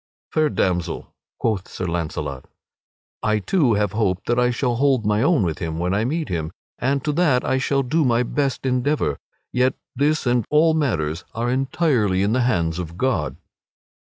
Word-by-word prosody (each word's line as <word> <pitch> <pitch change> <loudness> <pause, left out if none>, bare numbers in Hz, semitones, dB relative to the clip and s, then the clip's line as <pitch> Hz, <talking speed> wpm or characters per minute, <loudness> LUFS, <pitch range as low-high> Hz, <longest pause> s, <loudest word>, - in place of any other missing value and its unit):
"Fair 155 -1 +2
damsel," 90 - -1 0.2
quoth 105 -5 -1
Sir 95 - -5
Launcelot, 80 -6 -3 0.8
"I 110 0 +2
too 125 - +2
have 105 -2 +1
hope 100 -4 0
that 120 +1 +1
I 125 0 +3
shall 120 -1 0
hold 130 -4 +2
mine 105 +2 +2
own 150 - +3
with 80 -4 -2
him, 80 -1 -3
when 90 +2 0
I 105 +3 +1
meet 155 +5 -1
him, 80 -2 -3 0.3
and 135 +2 0
to 150 - 0
that 145 -5 +2
I 130 - +1
shall 135 +1 +1
do 155 +6 +1
my 120 -2 +3
best 135 0 -1
endeavor. 125 - 0 0.3
Yet 125 +1 +2 0.2
this 150 +3 +1
and 120 -1 +2
all 155 +2 +4
other 160 - +1
matters 80 - -1
are 120 +2 -1
entirely 130 - +1
in 105 +2 +1
the 130 - +2
hands 85 -9 +1
of 85 -1 -6
God." 85 - 0
120 Hz, 180 wpm, -22 LUFS, 95-135 Hz, 0.8 s, all